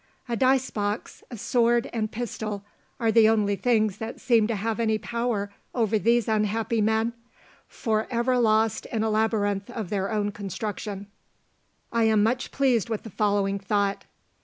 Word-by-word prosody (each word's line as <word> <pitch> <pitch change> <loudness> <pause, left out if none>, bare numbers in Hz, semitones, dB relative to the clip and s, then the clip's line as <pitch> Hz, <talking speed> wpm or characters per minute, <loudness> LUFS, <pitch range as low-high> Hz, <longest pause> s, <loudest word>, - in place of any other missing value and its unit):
A 235 - -1
dice 260 +2 +2
box, 205 +1 -3
a 240 - -7
sword, 235 +3 +2
and 220 -2 -2
pistol, 215 -3 -4 0.3
are 225 -1 +2
the 220 -1 +6
only 210 -2 +2
things 215 -3 +1
that 225 +1 -6
seem 230 -4 +3
to 230 - -1
have 220 +3 -2
any 220 -1 +2
power 225 -3 -2 0.2
over 220 -3 +2
these 235 +1 +2
unhappy 220 +1 0
men, 220 +2 +1 0.5
for 220 -2 -1
ever 245 +1 +1
lost 220 -1 +2
in 220 -2 -1
a 220 - 0
labyrinth 210 -2 0
of 225 -6 -5
their 195 -2 -1
own 205 -1 0
construction. 205 0 -5 0.9
I 230 -1 +2
am 215 -2 +4
much 240 +3 0
pleased 250 -5 +1
with 220 -2 -3
the 225 - -9
following 200 -1 +1
thought. 200 0 -1
220 Hz, 160 wpm, -26 LUFS, 205-235 Hz, 0.9 s, the